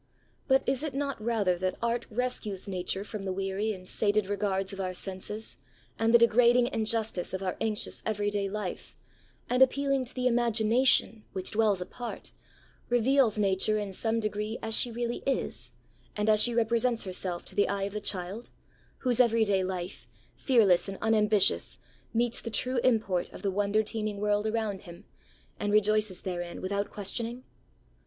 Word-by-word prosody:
But 265 0 +4
is 265 0 +1
it 300 -4 -4
not 275 -5 -3
rather 205 -6 +1
that 185 0 -1
art 235 +1 -1
rescues 215 -5 -2
nature 190 0 -2
from 215 0 -7
the 190 - -2
weary 195 +3 -1
and 185 -3 -7
sated 210 0 +2
regards 195 -1 -1
of 195 - -8
our 185 -1 -3
senses, 195 +4 -5 0.4
and 225 0 +3
the 235 - +8
degrading 240 +1 +5
injustice 220 -5 0
of 190 - -4
our 185 - -2
anxious 220 -2 -2
everyday 205 -2 -1
life, 205 -2 -5 0.5
and, 250 +1 +1
appealing 275 0 +3
to 245 - -9
the 255 -1 -2
imagination, 235 -1 +2
which 190 -1 -3
dwells 210 -4 +2
apart, 240 +6 -6 0.6
reveals 245 -1 +3
Nature 200 +1 +2
in 205 -2 -4
some 225 +4 +1
degree 215 +1 -2
as 225 0 -2
she 245 - +1
really 240 +1 -3
is, 270 - -2 0.4
and 210 +1 0
as 215 0 +5
she 240 0 +2
represents 235 +1 +2
herself 185 -2 -3
to - - -9
the 205 - +2
eye 200 -1 -1
of 200 0 -3
the 210 - -3
child, 195 +3 -4 0.5
whose 250 -2 0
every 230 -2 +4
day 195 -3 +2
life, 185 0 -5 0.3
fearless 210 -10 +3
and 195 - -6
unambitious, 215 -2 +3 0.3
meets 235 0 +1
the 230 - -5
true 255 +3 0
import 215 -8 +1
of - - -11
the 200 - +1
wonder 205 +2 +1
teeming 215 -1 -3
world 210 +1 +1
around 215 -3 -2
him, 170 -3 -12 0.5
and 205 - -1
rejoices 215 -2 +2
therein 175 -2 -4
without 200 +2 -2
questioning? 230 +5 -2
215 Hz, 165 wpm, -29 LUFS, 195-235 Hz, 0.6 s, the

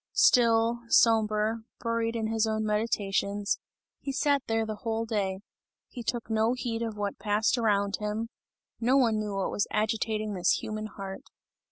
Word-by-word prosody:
Still, 235 -9 +4
sombre, 220 -1 +3 0.2
buried 230 0 -1
in 225 -1 -1
his 220 0 +1
own 220 0 -1
meditations, 205 -2 0 0.4
he 275 - -4
sat 285 +1 +2
there 225 0 +1
the 215 -1 -5
whole 225 +1 -2
day; 200 -4 -2 0.5
he 245 - -7
took 235 +1 -3
no 220 +1 +2
heed 240 -2 -3
of 225 -2 -3
what 205 -1 -3
passed 210 +3 +2
around 205 -4 +1
him, 210 +2 -3 0.5
no 250 +4 +3
one 230 -5 +3
knew 210 -2 -3
what 195 - -1
was 205 - 0
agitating 215 0 -1
this 180 -2 +2
human 215 0 -3
heart. 195 -2 -7
220 Hz, 160 wpm, -28 LUFS, 210-230 Hz, 0.5 s, Still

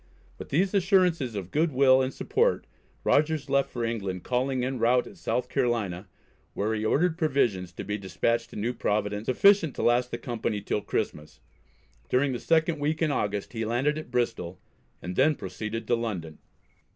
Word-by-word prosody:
With - - -8
these 185 +7 +1
assurances 180 - +2
of 95 -2 -5
good 160 +2 +2
will 130 0 +5
and 130 0 -1
support 450 - 0 0.4
Rogers 150 -1 +1
left 140 0 +2
for 120 - -4
England, 100 -6 -3
calling 130 0 0
en 130 -1 -3
route 120 +2 +3
at - - -12
South 125 -8 -2
Carolina, 115 -8 -1 0.5
where 105 +2 0
he 105 -1 -2
ordered 165 +9 +1
provisions 120 - +1
to - - -6
be 105 +1 -3
despatched 115 +4 -1
to - - -12
New 115 +4 -1
Providence 105 -1 -1
sufficient 170 +2 +4
to - - -3
last 120 +1 +3
the - - -4
company 115 -3 -3
till 105 +1 -2
Christmas. 75 -5 -4 0.7
During 135 +2 +2
the 120 - -3
second 160 -1 +2
week 155 +3 0
in 155 - +2
August 105 -5 -2
he 115 -1 -2
landed 125 +7 0
at 155 - -9
Bristol, 115 -8 -2 0.4
and 90 0 -5
then 150 +3 +4
proceeded 110 +4 -5
to - - 0
London. 95 -10 -4
125 Hz, 175 wpm, -27 LUFS, 105-145 Hz, 0.7 s, will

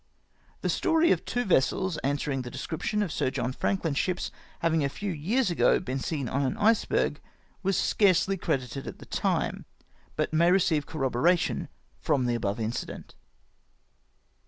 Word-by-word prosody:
The - - -1
story 325 +1 +3
of 175 - +2
two 245 +1 -1
vessels 185 +1 +1
answering 140 0 -1
tlie 125 - -6
description 210 - -2
of 185 - -4
Sir 145 -3 0
John 130 -1 -2
Franklin's 165 -3 0
ships 180 -1 -1 0.3
having 165 -2 +2
a 140 - +1
few 200 +7 -4
years 185 - 0
ago 170 - +3
been 135 -6 -3
seen 140 -1 -2
on 135 +4 -1
an 130 -2 -1
iceberg 220 +1 +2 0.4
was 195 -1 +1
scarcely 195 -1 +3
credited 135 -7 -2
at - - -6
the - - -12
time, - - -1 0.5
but - - -1
may 170 +2 +4
receive 165 -6 +2
corroboration 155 +4 +1 0.3
from 140 -5 +1
the 120 - +1
above 105 -2 -1
incident. 110 +1 -4
160 Hz, 155 wpm, -28 LUFS, 135-190 Hz, 0.5 s, may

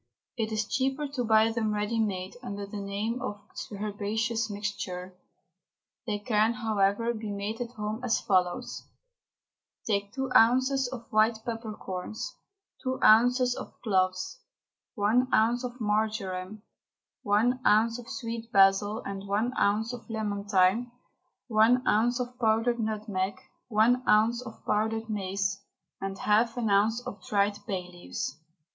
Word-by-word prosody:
It 225 -2 -2
is 215 -1 0
cheaper 270 +4 0
to 265 -3 -2
buy 220 0 +4
them 220 -2 -1
ready 210 +2 -1
made, 190 -3 -2
under 200 -5 -5
the 205 +1 -7
name 205 +5 -3
of 205 - -4 0.3
Herbaceous 215 +2 -2
Mixture. 200 -3 -4 0.9
They 210 -2 0
can, 215 +1 +2
however, 220 -1 +1
be 220 -2 -6
made 205 +3 -4
at 240 0 -5
home 215 +1 -4
as 245 -3 +2
follows: 185 -4 0 1.0
Take 200 -2 0
two 265 +1 -3
ounces 260 +3 +4
of 245 -2 -7
white 220 0 +2
peppercorns, 220 -1 -5 0.5
two 260 0 -2
ounces 245 +3 +5
of - - -9
cloves, 185 - 0 0.6
one 235 +4 +2
ounce 235 +3 +3
of 250 0 -6
marjoram, 210 -2 -2 0.6
one 225 +5 +2
ounce 225 +3 +3
of 235 - -11
sweet 230 0 -5
basil 200 +2 +4
and 200 0 -5
one 215 +6 0
ounce 220 +4 +1
of 245 0 -9
lemon 210 -2 -3
thyme, 205 +4 +3 0.6
one 235 +2 +4
ounce 240 +4 +3
of 250 0 -5
powdered 230 +1 +2
nutmeg, 210 -3 -2 0.3
one 235 +2 +3
ounce 225 +3 +4
of 225 -3 -11
powdered 220 +1 0
mace, 195 0 -2 0.4
and 195 0 -4
half 225 +5 +2
an 225 -4 0
ounce 220 +4 +2
of 200 -2 -7
dried 205 0 +1
bay 190 -4 -2
leaves. 175 -4 -5
220 Hz, 140 wpm, -28 LUFS, 200-235 Hz, 1.0 s, ounces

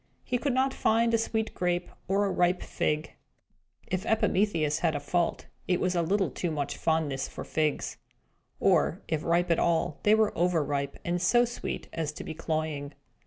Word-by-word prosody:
He 245 - -1
could 275 -1 0
not 265 +1 +2
find 230 -1 +2
a - - +5
sweet 220 0 -1
grape 175 0 0 0.2
or 200 +2 +2
a 195 - 0
ripe 180 0 +2
fig 155 +1 -1 0.7
(if 185 0 -2
Epimetheus 180 -8 +1
had 165 -3 +1
a - - -1
fault, 170 +4 -1 0.2
it 180 -1 +2
was 185 0 +1
a 175 - +2
little 190 +4 +1
too 175 - -2
much 145 -3 -2
fondness 155 -4 0
for - - -7
figs); 155 -2 -1 0.6
or, - - +2
if 160 -2 -1
ripe 170 +1 +2
at 165 - +3
all, 165 -3 +1
they 210 +1 +5
were 220 -1 +2
overripe, 145 -5 0
and 175 0 0
so 240 +7 +4
sweet 240 - -5
as 160 -3 -2
to - - -7
be - - -5
cloying. 155 -3 -3
175 Hz, 180 wpm, -28 LUFS, 155-205 Hz, 0.7 s, a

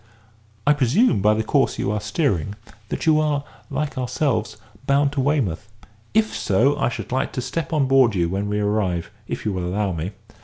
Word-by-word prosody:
I 145 - +6
presume, 145 - +3
by 105 +2 +4
the 110 - 0
course - - +1
you 100 - -1
are 105 -1 -1
steering, 105 - -1 0.3
that - - -3
you 155 -1 +5
are, 150 -2 +1 0.3
like 150 -3 -2
ourselves, 125 -4 -1 0.3
bound 140 0 +3
to 145 -2 -1
Weymouth. 125 - 0 0.5
If 220 0 +2
so, 120 +9 +2
I - - +2
should 120 - -6
like 130 +2 0
to - - -2
step 135 +5 -3
on 150 -4 +2
board 130 -5 +4
you 85 -2 +2
when 100 +4 -2
we 105 0 0
arrive, 105 -5 0 0.2
if - - -5
you 105 - 0
will 90 -1 -2
allow 100 +2 -1
me. 85 +4 -4
120 Hz, 195 wpm, -22 LUFS, 100-145 Hz, 0.5 s, I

